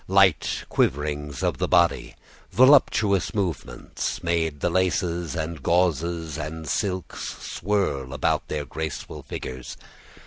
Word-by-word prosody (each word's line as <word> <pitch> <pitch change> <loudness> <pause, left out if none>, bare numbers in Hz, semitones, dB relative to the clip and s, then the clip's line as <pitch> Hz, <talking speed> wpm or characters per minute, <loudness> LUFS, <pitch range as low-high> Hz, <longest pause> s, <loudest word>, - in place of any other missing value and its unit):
Light 95 -4 +3
quiverings 75 -1 -1
of - - 0
the - - +1
body, 85 -1 +2 0.4
voluptuous 110 - +4
movements, 85 - -3
made 80 -3 0
the 85 - 0
laces 90 -3 0
and 80 -1 -4
gauzes 85 -1 0
and 80 +1 -5
silks 95 -4 -2 0.2
swirl 80 -10 -1
about - - 0
their 75 -1 -3
graceful 80 0 -5
figures. 65 -1 -7
85 Hz, 110 wpm, -25 LUFS, 75-95 Hz, 0.4 s, voluptuous